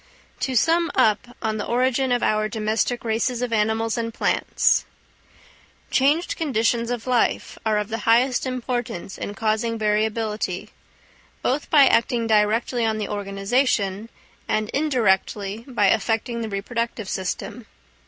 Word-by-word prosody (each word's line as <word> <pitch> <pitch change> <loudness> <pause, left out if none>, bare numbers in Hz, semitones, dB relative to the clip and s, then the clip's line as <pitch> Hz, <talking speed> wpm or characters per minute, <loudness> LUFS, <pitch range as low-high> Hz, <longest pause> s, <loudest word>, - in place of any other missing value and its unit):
To 260 - -2
sum 330 +7 +3
up 225 +3 +1
on 220 -1 -1
the 210 - -2
origin 255 +2 +1
of 245 -1 +1
our 215 0 +1
domestic 220 +2 -1
races 235 +2 0
of 245 -2 -2
animals 220 +2 +1
and 230 0 -2
plants. - - +1 1.1
Changed 290 +6 +2
conditions 235 -5 0
of 245 -2 -3
life 250 -2 0
are 215 -1 +2
of 210 0 -2
the 225 0 -3
highest 245 +4 +2
importance 245 -7 -4
in 205 - -5
causing 225 +2 0
variability, 215 -3 -1 0.7
both 275 +4 -1
by 290 -3 +7
acting 235 -1 +2
directly 225 +3 +2
on 220 -1 +1
the 210 -2 -3
organisation, 200 +1 0 0.4
and 215 0 0
indirectly 220 -6 0
by 235 -6 +1
affecting 225 +2 0
the 225 - -3
reproductive 225 +2 -3
system. 195 +5 -4
225 Hz, 135 wpm, -23 LUFS, 215-245 Hz, 1.1 s, by